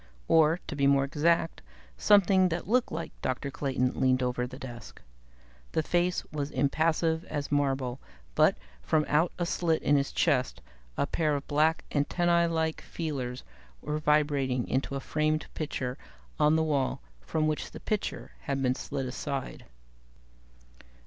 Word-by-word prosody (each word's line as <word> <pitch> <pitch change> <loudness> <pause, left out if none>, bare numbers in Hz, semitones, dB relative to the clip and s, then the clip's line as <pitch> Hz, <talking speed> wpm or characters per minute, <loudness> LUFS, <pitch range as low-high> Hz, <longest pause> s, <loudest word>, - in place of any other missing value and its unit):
Or, 160 +1 +4
to 155 - -5
be 140 -1 +2
more 140 0 +4
exact, 165 +4 +1 0.3
something 190 - +5
that 170 +1 -3
looked 245 +3 +2
like 165 0 -4
Dr. 130 +2 -2
Clayton 130 -2 0
leaned 130 -1 +3
over 125 0 -1
the 130 +1 -10
desk. 120 -4 -9 0.7
The 160 - +1
face 175 +2 0
was 145 -2 -3
impassive 160 +4 +1
as 145 -2 -4
marble, 135 -3 0 0.3
but, - - +4 0.2
from 150 - +1
out 155 +4 +2
a 175 - 0
slit 165 -2 0
in 145 - +4
his 140 0 0
chest, 130 -6 +1 0.4
a - - +2
pair 155 0 0
of 140 - -5
black 155 +2 +2
antennae 170 +3 +2
like 160 -1 -1
feelers 135 -6 -4 0.4
were 150 +1 -3
vibrating 145 -4 +1
into 135 +1 -1
a - - -1
framed 155 +2 0
picture 135 -4 -3 0.4
on 150 +1 +5
the 160 - +3
wall, 140 - 0 0.2
from 155 - -1
which 155 -1 -2
the - - -10
picture 215 -2 -3
had 140 -1 -2
been 130 -2 +2
slid 135 0 -4
aside. 135 +1 -4
150 Hz, 150 wpm, -29 LUFS, 135-160 Hz, 0.7 s, something